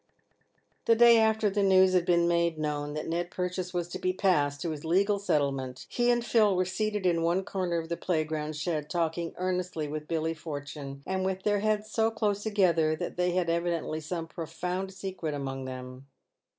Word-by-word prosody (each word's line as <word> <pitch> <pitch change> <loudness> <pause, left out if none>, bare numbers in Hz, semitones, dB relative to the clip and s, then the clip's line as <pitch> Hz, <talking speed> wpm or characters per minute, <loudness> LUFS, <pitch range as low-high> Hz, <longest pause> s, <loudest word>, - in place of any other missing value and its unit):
The 230 - +5
day 235 0 +7
after 220 -1 +3
the 205 0 0
news 190 -1 +5
had 180 -1 +2
been 170 -1 +4
made 170 -1 +1
known 150 -1 -2
that 155 - -4
Ned 170 +1 -2
Purchase 180 0 -3
was 175 -1 -2
to - - -5
be 185 - +1
passed 150 -7 +1
to 170 - -2
his 150 -2 -6
legal 200 +5 +2
settlement, 135 -8 -1
he 240 0 +1
and 240 -1 +2
Phil 215 -5 +4
were 185 0 +2
seated 210 +1 -2
in 170 -2 +2
one 170 +3 +1
corner 180 -4 -1
of 165 -1 -3
the 170 - -2
playground 155 -3 -2
shed 150 -1 -2
talking 170 -1 -1
earnestly 180 -3 -2
with 150 +1 -5
Billy 160 -1 -1
Fortune, 145 -3 -7
and 190 0 -1
with 190 0 -2
their 205 -1 +2
heads 215 0 0
so 225 0 +2
close 210 -2 -1
together 175 -7 +2
that - - -5
they 180 0 +1
had 180 -1 +1
evi 170 0 0
dently 155 0 -4
some 165 +2 -4
profound 180 +4 -4
secret 190 -5 -4
among 135 -1 -4
them. 130 +1 -8
175 Hz, 195 wpm, -29 LUFS, 155-190 Hz, -, day